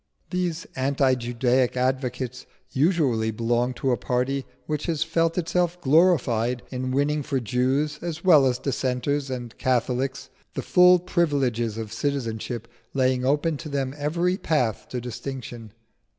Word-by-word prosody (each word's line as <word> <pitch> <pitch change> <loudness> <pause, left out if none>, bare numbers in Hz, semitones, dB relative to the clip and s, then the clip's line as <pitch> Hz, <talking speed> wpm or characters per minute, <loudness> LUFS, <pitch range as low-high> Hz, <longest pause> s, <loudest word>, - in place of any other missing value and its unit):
These 180 0 -1
anti 135 0 +2
Judaic 120 +1 +1
advocates 125 -1 -2 0.2
usually 135 -7 +2
belong 120 +3 0
to 130 - 0
a 120 - +2
party 130 +2 -1 0.2
which 150 -1 -3
has 160 -3 +1
felt 165 0 0
itself 175 0 0
glorified 130 -7 +3
in 130 0 -3
winning 145 +3 +1
for 135 -1 -1
Jews, 130 +6 0
as 170 -1 -5
well 155 -8 +6
as 125 -1 +1
Dissenters 135 +1 -1
and 120 -3 -5
Catholics, 130 +1 -1 0.2
the - - -3
full 180 0 +6
privileges 135 - 0
of 110 -1 -5
citizenship, 115 -3 -3 0.3
laying 130 -1 +2
open 145 +4 +1
to 155 +1 -7
them 135 -2 -2
every 170 +5 0
path 125 - 0
to 125 - -3
distinction. 120 -2 -7
130 Hz, 135 wpm, -25 LUFS, 125-150 Hz, 0.3 s, well